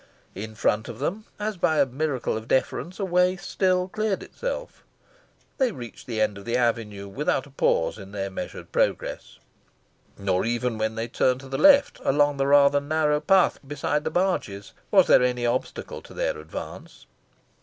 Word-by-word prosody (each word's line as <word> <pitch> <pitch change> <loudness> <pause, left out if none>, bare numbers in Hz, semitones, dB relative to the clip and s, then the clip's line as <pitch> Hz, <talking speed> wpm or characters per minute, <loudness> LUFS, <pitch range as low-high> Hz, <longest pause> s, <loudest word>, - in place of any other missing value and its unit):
In 110 +3 -7
front 110 +1 +1
of 115 - -7
them, 190 - -3
as 210 -1 -2
by 165 -3 +2
a - - +5
miracle 135 -1 -2
of 110 +1 -6
deference, 155 +7 -1
a 195 - 0
way 180 0 +3
still 185 0 0
cleared 215 0 -2
itself. - - -6 0.8
They 260 -3 +3
reached 120 - -10
the 115 -3 -3
end 105 -2 0
of 100 - -13
the 120 +1 0
avenue 110 -5 -1
without 130 +5 -1
a 145 - -16
pause 110 -6 +1
in 100 -1 -10
their 100 -1 -4
measured - - -7
progress. - - -1 0.8
Nor 95 -2 0
even 120 0 -1
when 110 0 -1
they 115 +1 -3
turned 130 +1 +1
to 135 - -11
the 135 - -3
left, 280 -1 +6
along 145 +1 +2
the 135 0 +1
rather 145 0 +5
narrow 150 0 +1
path 185 +4 +3
beside 145 +1 -1
the - - -1
barges, 160 - -1 0.2
was - - +6
there - - +6
any 125 -1 +1
obstacle 120 +2 -3
to - - -14
their - - -1
advance. - - -9
135 Hz, 175 wpm, -25 LUFS, 115-180 Hz, 0.8 s, left